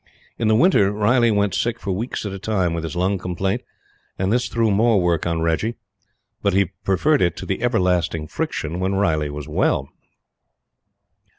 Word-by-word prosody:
In 115 Hz, -, +1 dB
the 110 Hz, -, +4 dB
winter 110 Hz, -, +4 dB
Riley 115 Hz, +4 st, +3 dB
went 105 Hz, -2 st, +1 dB
sick 120 Hz, -1 st, -1 dB
for 100 Hz, -, -3 dB
weeks 110 Hz, +5 st, -3 dB
at 100 Hz, -, -3 dB
a 95 Hz, -, -6 dB
time 95 Hz, -4 st, 0 dB
with 85 Hz, -1 st, -3 dB
his 80 Hz, +1 st, -5 dB
lung 95 Hz, +2 st, 0 dB
complaint, 90 Hz, +2 st, -2 dB, 0.6 s
and 95 Hz, +3 st, 0 dB
this 120 Hz, -1 st, 0 dB
threw 115 Hz, -2 st, +1 dB
more 110 Hz, +1 st, +3 dB
work 85 Hz, -2 st, +1 dB
on 85 Hz, -1 st, -1 dB
Reggie. 85 Hz, +8 st, 0 dB, 0.7 s
But 100 Hz, -2 st, +1 dB
he 95 Hz, -2 st, +2 dB
preferred 145 Hz, -, +2 dB
it 85 Hz, -1 st, +1 dB
to -, -, -6 dB
the 95 Hz, -, -3 dB
everlasting 90 Hz, -8 st, +1 dB
friction 80 Hz, +2 st, -3 dB
when 95 Hz, +1 st, 0 dB
Riley 80 Hz, -7 st, +1 dB
was 75 Hz, 0 st, -7 dB
well. 70 Hz, -2 st, 0 dB
95 Hz, 180 wpm, -21 LUFS, 85-110 Hz, 0.7 s, the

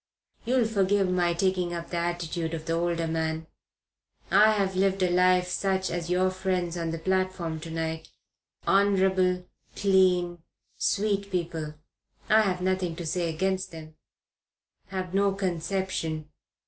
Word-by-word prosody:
You'll 250 Hz, 0 st, +3 dB
forgive 200 Hz, -3 st, +2 dB
my 175 Hz, -1 st, +2 dB
taking 180 Hz, -1 st, 0 dB
up 170 Hz, 0 st, -6 dB
the 175 Hz, -, -1 dB
attitude 170 Hz, -1 st, -2 dB
of 155 Hz, -1 st, -7 dB
the 165 Hz, -, -1 dB
older 170 Hz, 0 st, 0 dB
man. 160 Hz, 0 st, -2 dB, 0.9 s
I 215 Hz, +1 st, +6 dB
have 195 Hz, -2 st, 0 dB
lived 195 Hz, 0 st, +2 dB
a 180 Hz, -, +2 dB
life 180 Hz, 0 st, +4 dB
such 190 Hz, +1 st, 0 dB
as 170 Hz, 0 st, -3 dB
your 185 Hz, +1 st, +2 dB
friends 185 Hz, -2 st, -1 dB
on 165 Hz, -1 st, -2 dB
the 165 Hz, -, -3 dB
platform 185 Hz, -2 st, -1 dB
to 165 Hz, +1 st, -8 dB
night 160 Hz, 0 st, -3 dB, 0.6 s
honorable, 190 Hz, -2 st, +3 dB, 0.3 s
clean, 180 Hz, -3 st, +3 dB, 0.4 s
sweet 200 Hz, -1 st, 0 dB
people 165 Hz, -4 st, -3 dB, 0.5 s
I've 205 Hz, -4 st, +3 dB
nothing 185 Hz, -2 st, 0 dB
to 170 Hz, 0 st, -6 dB
say 170 Hz, +1 st, -1 dB
against 190 Hz, +3 st, -1 dB
them 160 Hz, -1 st, -10 dB, 0.9 s
have 185 Hz, -2 st, -4 dB
no 200 Hz, 0 st, +3 dB
conception. 175 Hz, -4 st, -2 dB
180 Hz, 135 wpm, -27 LUFS, 165-190 Hz, 0.9 s, I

